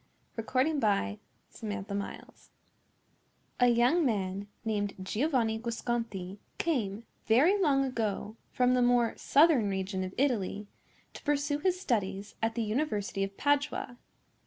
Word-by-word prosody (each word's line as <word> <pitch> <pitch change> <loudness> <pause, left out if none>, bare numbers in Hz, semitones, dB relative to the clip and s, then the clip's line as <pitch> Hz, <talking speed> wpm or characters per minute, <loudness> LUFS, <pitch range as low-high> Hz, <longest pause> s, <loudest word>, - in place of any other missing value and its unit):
RAPPACCINI'S 225 - +1 0.4
DAUGHTER 200 -2 -4 1.3
A 245 - +6
young 245 +8 +4
man, 200 -5 -1 0.2
named 205 -2 -1
Giovanni 225 0 0
Guasconti, 225 -5 -3 0.2
came, 225 -10 -1 0.2
very 270 - +5
long 275 -5 +3
ago, 220 -4 -2 0.2
from 250 0 +3
the 250 - +3
more 245 -1 +3
southern 280 -8 +4
region 190 0 -2
of 185 0 -6
Italy, 210 -6 0 0.5
to - - -10
pursue 290 0 0
his 365 +3 +1
studies 205 - -2
at 225 0 0
the 235 - 0
University 210 -4 -1
of 195 0 -5
Padua. 285 -3 0
230 Hz, 115 wpm, -30 LUFS, 200-270 Hz, 1.3 s, A